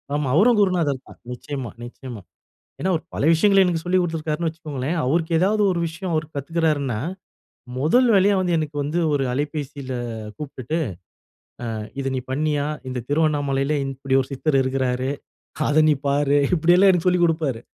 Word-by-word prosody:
ஆமா. 145 Hz, -1 st, -1 dB
அவரும் 225 Hz, +7 st, +5 dB
குருநாதர் 165 Hz, -9 st, +1 dB
தான். -, -, -14 dB
நிச்சயமா 130 Hz, 0 st, -5 dB
நிச்சயமா. 120 Hz, -2 st, -9 dB, 0.6 s
ஏன்னா 190 Hz, -, -1 dB
அவர் 160 Hz, -, -1 dB
பல -, -, -2 dB
விஷயங்கள 195 Hz, +4 st, +4 dB
எனக்கு 170 Hz, -2 st, 0 dB
சொல்லி 180 Hz, +2 st, +1 dB
கொடுத்துருக்காருன்னு 165 Hz, -1 st, -1 dB
வச்சுக்கோங்களேன். 155 Hz, -2 st, -4 dB
அவருக்கு 160 Hz, +6 st, 0 dB
ஏதாவது 210 Hz, +4 st, +2 dB
ஒரு 175 Hz, -, -1 dB
விஷயம் 175 Hz, +2 st, -4 dB
அவர் 155 Hz, -1 st, 0 dB
கத்துக்கிறாருன்னா, 145 Hz, -4 st, 0 dB, 0.8 s
முதல் 170 Hz, -, +3 dB
வேலையா 200 Hz, +1 st, +4 dB
வந்து 180 Hz, -2 st, +1 dB
எனக்கு 155 Hz, -2 st, -3 dB
வந்து 150 Hz, +5 st, -1 dB
ஒரு 140 Hz, -2 st, +1 dB
அலைபேசியில 145 Hz, -1 st, -4 dB, 0.5 s
கூப்பிட்டுட்டு, 150 Hz, +1 st, -4 dB, 1.0 s
அ -, -, -4 dB, 0.3 s
"இத 135 Hz, 0 st, -2 dB
நீ -, -, -1 dB
பண்ணியா 145 Hz, +1 st, 0 dB, 0.2 s
இந்த 125 Hz, -1 st, -4 dB
திருவண்ணாமலையில 145 Hz, -1 st, +1 dB
ன் 135 Hz, -, -3 dB
இப்படி 135 Hz, 0 st, 0 dB
ஒரு 130 Hz, -, -5 dB
சித்தர் 135 Hz, +1 st, +1 dB
இருக்கிறாரு, 130 Hz, 0 st, -1 dB, 0.6 s
அத 155 Hz, +2 st, +4 dB
நீ 150 Hz, -, +5 dB
பாரு" 145 Hz, 0 st, +2 dB, 0.2 s
இப்படியெல்லா 175 Hz, +4 st, +5 dB
எனக்கு 180 Hz, 0 st, +1 dB
சொல்லிக் 180 Hz, -1 st, +3 dB
கொடுப்பாரு. 155 Hz, -8 st, -1 dB
150 Hz, 155 wpm, -22 LUFS, 135-170 Hz, 1.0 s, அவரும்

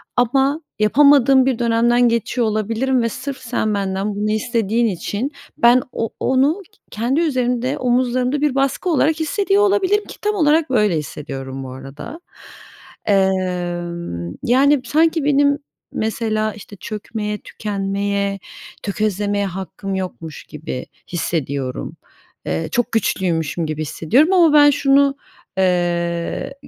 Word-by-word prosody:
ama 270 Hz, +5 st, +2 dB, 0.2 s
yapamadığım 270 Hz, +3 st, +5 dB
bir 260 Hz, -3 st, 0 dB
dönemden 240 Hz, +1 st, +3 dB
geçiyor 235 Hz, +1 st, 0 dB
olabilirim 230 Hz, +5 st, 0 dB
ve 230 Hz, -, 0 dB
sırf 265 Hz, +4 st, -5 dB
sen 230 Hz, -3 st, -2 dB
benden 195 Hz, +1 st, -2 dB
bunu 210 Hz, +1 st, -1 dB
istediğin 230 Hz, +1 st, 0 dB
için 205 Hz, -, -3 dB, 0.3 s
ben 240 Hz, +2 st, +5 dB
o 225 Hz, -, -2 dB
onu 280 Hz, +9 st, +2 dB
ke -, -, -29 dB
kendi 240 Hz, +7 st, 0 dB
üzerimde, 255 Hz, -5 st, 0 dB
omuzlarımda 250 Hz, +2 st, +1 dB
bir 295 Hz, -3 st, +1 dB
baskı 275 Hz, +7 st, 0 dB
olarak 320 Hz, 0 st, +2 dB
hissediyor 395 Hz, +6 st, +1 dB
olabilirim 410 Hz, +1 st, +2 dB
ki -, -, -11 dB
tam 420 Hz, 0 st, 0 dB
olarak 310 Hz, -2 st, +3 dB
böyle 210 Hz, -9 st, +2 dB
hissediyorum 135 Hz, -3 st, -6 dB
bu 130 Hz, -, -7 dB
arada. 135 Hz, -, -9 dB, 0.8 s
Emm, 175 Hz, -, -1 dB
yani, 270 Hz, +3 st, +4 dB
sanki 320 Hz, +3 st, +2 dB
benim, 285 Hz, 0 st, +3 dB, 0.3 s
mesela, 215 Hz, -1 st, -1 dB
işte, 210 Hz, 0 st, -12 dB
çökmeye, 210 Hz, +1 st, -5 dB
tükenmeye, 200 Hz, -1 st, -2 dB, 0.4 s
tökezlemeye 205 Hz, 0 st, -1 dB
hakkım 195 Hz, +1 st, -5 dB
yokmuş 180 Hz, -4 st, -6 dB
gibi 150 Hz, -4 st, -6 dB, 0.3 s
hissediyorum. 140 Hz, -6 st, -3 dB, 0.5 s
Eee, 80 Hz, +1 st, -2 dB
çok 245 Hz, -, 0 dB
güçlüymüşüm 170 Hz, -6 st, 0 dB
gibi 155 Hz, 0 st, -4 dB
hissediyorum 245 Hz, -, +2 dB
ama 340 Hz, -5 st, +5 dB
ben 290 Hz, -1 st, +7 dB
şunu, 275 Hz, 0 st, +3 dB, 0.4 s
eee, 175 Hz, +3 st, 0 dB
225 Hz, 120 wpm, -19 LUFS, 190-275 Hz, 0.8 s, ben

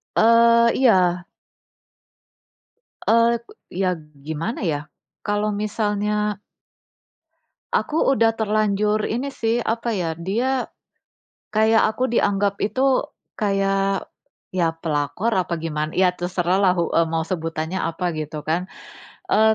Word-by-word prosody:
Eee, 230 Hz, +1 st, +5 dB
iya. 180 Hz, -8 st, +3 dB, 1.8 s
Eee, 230 Hz, +1 st, +4 dB
k -, -, -51 dB, 0.3 s
iya 190 Hz, -1 st, +2 dB
g 155 Hz, -, -15 dB, 0.2 s
gimana 160 Hz, +11 st, -3 dB
ya, 145 Hz, -, -1 dB, 0.5 s
kalau 205 Hz, 0 st, 0 dB
misalnya 210 Hz, -1 st, -1 dB, 1.3 s
aku 315 Hz, +2 st, +1 dB
udah 225 Hz, -4 st, +3 dB
terlanjur 210 Hz, -1 st, +1 dB
ini 255 Hz, +5 st, -2 dB
sih, 230 Hz, -2 st, -1 dB
apa 230 Hz, 0 st, -1 dB
ya, 170 Hz, -4 st, -1 dB
dia 245 Hz, +9 st, -1 dB, 0.8 s
kayak 220 Hz, +1 st, +4 dB
aku 255 Hz, +3 st, -1 dB
dianggap 200 Hz, -3 st, +1 dB
itu 260 Hz, +5 st, +2 dB, 0.3 s
kayak 195 Hz, -1 st, 0 dB, 0.5 s
ya 170 Hz, -3 st, +2 dB
pelakor 165 Hz, +6 st, -2 dB
apa 175 Hz, -3 st, -1 dB
giman 155 Hz, -1 st, -3 dB
ya 180 Hz, 0 st, +2 dB
terserahlah, 180 Hz, +2 st, +1 dB
hu 170 Hz, -, +1 dB, 0.2 s
mau 160 Hz, 0 st, -1 dB
sebutannya 165 Hz, -1 st, -3 dB
apa 170 Hz, +1 st, -2 dB
gitu 155 Hz, 0 st, -5 dB
kan, 170 Hz, +5 st, -2 dB, 0.6 s
eee, 220 Hz, +1 st, +5 dB
200 Hz, 110 wpm, -22 LUFS, 175-225 Hz, 1.8 s, Eee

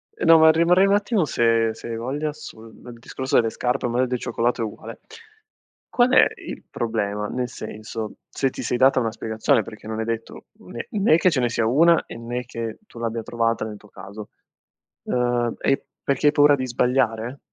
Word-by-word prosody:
Eh, -, -, -3 dB
no, 165 Hz, 0 st, +8 dB
ma 160 Hz, 0 st, +7 dB
rimarrei 175 Hz, +4 st, +4 dB
un 200 Hz, -, +3 dB
attimo 205 Hz, -3 st, +1 dB
se 115 Hz, -4 st, +2 dB
se 115 Hz, -, -10 dB
hai 115 Hz, -, -4 dB
voglia 145 Hz, +6 st, -3 dB
sul 115 Hz, -7 st, -12 dB, 0.2 s
discorso 130 Hz, +2 st, -4 dB
delle 115 Hz, -1 st, +3 dB
scarpe, 125 Hz, +3 st, -2 dB
o -, -, 0 dB
magari 125 Hz, +2 st, +1 dB
del 125 Hz, -1 st, -2 dB
cioccolato 120 Hz, 0 st, -1 dB
è -, -, 0 dB
uguale. 105 Hz, -, -9 dB, 0.9 s
Qual 245 Hz, 0 st, +3 dB
è -, -, +7 dB, 0.2 s
il -, -, -7 dB
problema? 105 Hz, -3 st, -2 dB
Nel 125 Hz, +2 st, -3 dB
senso, 110 Hz, -1 st, -7 dB
se 135 Hz, -, -1 dB
ti -, -, -8 dB
sei 125 Hz, -, -1 dB
data 130 Hz, +1 st, +4 dB
una 115 Hz, -2 st, -1 dB
spiegazione, 110 Hz, 0 st, 0 dB
perché 110 Hz, +1 st, -11 dB
non 110 Hz, 0 st, -4 dB
è -, -, -1 dB
detto 115 Hz, 0 st, -5 dB
né 120 Hz, -, -8 dB
né 195 Hz, -6 st, +3 dB
che 180 Hz, 0 st, +3 dB
ce 145 Hz, -, 0 dB
ne 120 Hz, -, +1 dB
sia 115 Hz, -1 st, 0 dB
una 165 Hz, +7 st, +4 dB
e -, -, -9 dB
né 120 Hz, +1 st, -4 dB
che 115 Hz, -2 st, -6 dB
tu 120 Hz, -, -13 dB
l'abbia 115 Hz, -1 st, -3 dB
trovata 115 Hz, -1 st, -1 dB
nel 105 Hz, -1 st, -7 dB
tuo 105 Hz, -, -19 dB
caso. 100 Hz, +2 st, -10 dB, 0.8 s
Uhm, 120 Hz, -1 st, 0 dB
è 135 Hz, -, +1 dB, 0.2 s
perché 140 Hz, +2 st, 0 dB
hai 145 Hz, -, +3 dB
paura 145 Hz, 0 st, +5 dB
di 130 Hz, -, -3 dB
sbagliare? 125 Hz, 0 st, 0 dB
120 Hz, 200 wpm, -23 LUFS, 115-135 Hz, 0.9 s, no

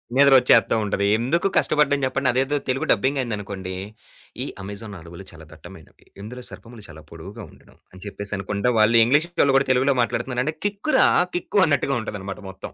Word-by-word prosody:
నిద్ర 140 Hz, 0 st, +6 dB
ఒచ్చేత్తా 120 Hz, -3 st, +3 dB
ఉంటది. 100 Hz, -1 st, -1 dB
ఎందుకు 145 Hz, -, 0 dB
కష్టపడ్డం 145 Hz, -1 st, +2 dB
జెప్పండి? 130 Hz, 0 st, 0 dB
అదేదో 135 Hz, +3 st, 0 dB
తెలుగు 130 Hz, +1 st, -1 dB
డబ్బింగైందనుకోండి, 105 Hz, -7 st, -2 dB, 0.7 s
"ఈ -, -, -5 dB, 0.2 s
అమెజాన్ 100 Hz, +2 st, -8 dB
అడవులు 85 Hz, +3 st, -12 dB
చాలా 80 Hz, -1 st, -14 dB
దట్టమైనవి. -, -, -15 dB, 0.2 s
ఇందులో 125 Hz, +5 st, -9 dB
సర్పములు 115 Hz, -2 st, -13 dB
చాలా 80 Hz, -1 st, -13 dB
పొడువుగా 95 Hz, +7 st, -10 dB
ఉండును." -, -, -21 dB, 0.2 s
అని 95 Hz, 0 st, -14 dB
చెప్పేసనుకుండ 100 Hz, 0 st, -5 dB, 0.2 s
వాళ్ళు 110 Hz, +2 st, +4 dB
ఇంగ్లీష్ 145 Hz, +7 st, +2 dB
వాళ్ళు 140 Hz, -1 st, +3 dB
కూడా 135 Hz, -, 0 dB
తెలుగులో 130 Hz, +2 st, +2 dB
మాట్లాడుతున్నారంటే 125 Hz, +4 st, -2 dB
కిక్ 205 Hz, +8 st, -2 dB
రా -, -, +5 dB, 0.3 s
కిక్కు! 180 Hz, +3 st, -1 dB
అన్నట్టుగా 140 Hz, -2 st, 0 dB
ఉంటదన్నమాట 100 Hz, -2 st, -7 dB
మొత్తం. 95 Hz, 0 st, -10 dB
115 Hz, 155 wpm, -22 LUFS, 100-135 Hz, 0.7 s, నిద్ర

